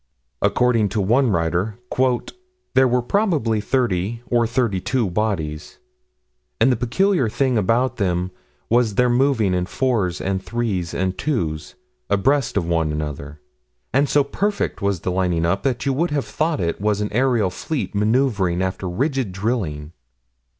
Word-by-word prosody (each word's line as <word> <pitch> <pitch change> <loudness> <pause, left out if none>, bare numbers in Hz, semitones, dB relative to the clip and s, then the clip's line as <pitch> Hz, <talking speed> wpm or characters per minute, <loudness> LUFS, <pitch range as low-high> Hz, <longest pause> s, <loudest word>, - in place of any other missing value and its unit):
According 110 +1 +2
to 110 - -2
one 120 +7 +3
writer: 85 +3 0 1.0
"There 130 0 +5
were 125 0 +1
probably 145 - +1
30 115 -2 -1
or 120 -1 +2
32 115 -2 0
bodies, 85 -7 -2 0.8
and 120 +4 +5
the - - +3
peculiar 130 - +1
thing 130 +2 0
about 115 +5 +1
them 90 -2 0 0.4
was 115 -3 +2
their 125 +1 +3
moving 120 -6 +2
in 90 0 0
fours 105 -6 0
and 95 -1 -2
threes 105 -7 -2
and 95 0 -1
twos, 80 - -2 0.3
abreast 135 +5 +1
of 90 - +1
one 80 -2 0
another; 75 -1 -5 0.5
and 140 +2 +3
so 145 - +4
perfect 200 - -2
was 100 -3 0
the 90 - -2
lining 90 -2 0
up 95 +4 +1
that 125 -3 -1
you 135 - +1
would 170 +6 0
have 145 -2 -1
thought 155 -2 -1
it 85 0 -2
was 105 -1 +1
an 105 - -1
aerial 120 -5 +2
fleet 150 - -4
maneuvering 105 -4 +1
after 95 0 -2
rigid 130 - -1
drilling." 95 -8 -2
110 Hz, 150 wpm, -21 LUFS, 90-130 Hz, 1.0 s, There